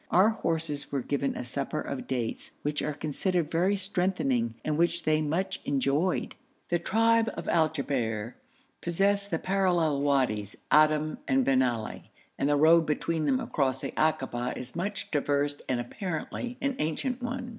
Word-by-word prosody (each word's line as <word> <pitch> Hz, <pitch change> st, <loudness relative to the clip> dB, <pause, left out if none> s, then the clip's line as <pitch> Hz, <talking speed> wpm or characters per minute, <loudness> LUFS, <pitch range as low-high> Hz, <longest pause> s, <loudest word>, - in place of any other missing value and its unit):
Our 190 Hz, +5 st, +5 dB
horses 160 Hz, -8 st, -2 dB
were 140 Hz, -3 st, -1 dB
given 140 Hz, +1 st, -1 dB
a 125 Hz, -, -4 dB
supper 140 Hz, +5 st, -3 dB
of 140 Hz, -, -5 dB
dates, 120 Hz, -4 st, -3 dB
which 150 Hz, 0 st, -1 dB
are 150 Hz, -, -1 dB
considered 155 Hz, +3 st, -1 dB
very 180 Hz, +5 st, +2 dB
strengthening, 180 Hz, -, 0 dB
and 155 Hz, -, 0 dB
which 170 Hz, +1 st, +1 dB
they 155 Hz, 0 st, +2 dB
much 185 Hz, +6 st, -1 dB
enjoyed. 145 Hz, +6 st, 0 dB, 0.4 s
The 175 Hz, -, +2 dB
tribe 225 Hz, +5 st, +3 dB
of 170 Hz, -, -6 dB
Al 160 Hz, -2 st, +3 dB
Jabber 115 Hz, -6 st, -2 dB, 0.5 s
possess 200 Hz, +4 st, +1 dB
the 165 Hz, -, -1 dB
parallel 175 Hz, -6 st, +1 dB
Wadis 130 Hz, -8 st, +1 dB, 0.2 s
Adim 155 Hz, 0 st, +4 dB
and 130 Hz, -1 st, +3 dB
Bin 135 Hz, -1 st, +4 dB
Ali, 120 Hz, -4 st, -2 dB, 0.3 s
and 140 Hz, -, +2 dB
the 145 Hz, -, +3 dB
road 160 Hz, +2 st, +6 dB
between 155 Hz, +1 st, 0 dB
them 135 Hz, -3 st, +2 dB
across 135 Hz, -2 st, 0 dB
the -, -, -4 dB
akaba 130 Hz, -6 st, 0 dB
is 125 Hz, +2 st, -7 dB
much 195 Hz, +4 st, -3 dB
traversed 145 Hz, -1 st, 0 dB
and 130 Hz, -2 st, +1 dB
apparently 195 Hz, -, -4 dB
an 275 Hz, -1 st, 0 dB
ancient 240 Hz, -, -1 dB
one. 245 Hz, 0 st, -4 dB
155 Hz, 160 wpm, -28 LUFS, 135-180 Hz, 0.5 s, road